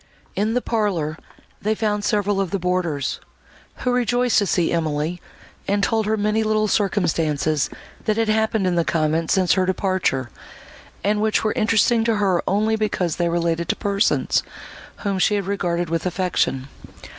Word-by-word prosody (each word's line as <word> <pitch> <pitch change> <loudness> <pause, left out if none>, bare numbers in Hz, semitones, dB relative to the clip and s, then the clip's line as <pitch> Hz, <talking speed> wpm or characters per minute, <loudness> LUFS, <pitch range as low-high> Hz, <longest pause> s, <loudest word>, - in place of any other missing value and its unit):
In 215 +3 0
the 250 - 0
parlour, 185 -9 -1 0.5
they 215 +1 0
found 210 -1 -1
several 205 -1 +1
of 190 - -2
the 195 - -1
boarders, 180 -6 -1 0.7
who 250 - +3
rejoiced 245 0 +2
to 200 - 0
see 175 -2 +1
Emily, 160 +1 -1 0.5
and 200 0 +1
told 220 -1 +1
her 220 0 +1
many 210 +1 +1
little 215 0 +1
circumstances 160 -7 +1 0.4
that 215 -1 +1
had 225 -1 +1
happened 220 -1 +1
in 180 - +1
the 170 -1 +2
convent 160 0 0
since 185 -2 +3
her 185 -1 +1
departure, 185 - 0 0.7
and 210 +1 +1
which 215 0 +1
were 215 - +1
interesting 225 0 +3
to 230 -1 +2
her 195 -4 +2
only 215 +2 +2
because 195 -6 -1
they 175 -1 +1
related 170 0 -1
to - - +2
persons, 200 0 +1 0.6
whom 200 -3 -1
she 210 +3 +3
had 200 -2 -1
regarded 175 -3 -1
with 165 +2 0
affection. 175 -7 -1
195 Hz, 165 wpm, -22 LUFS, 170-215 Hz, 0.7 s, who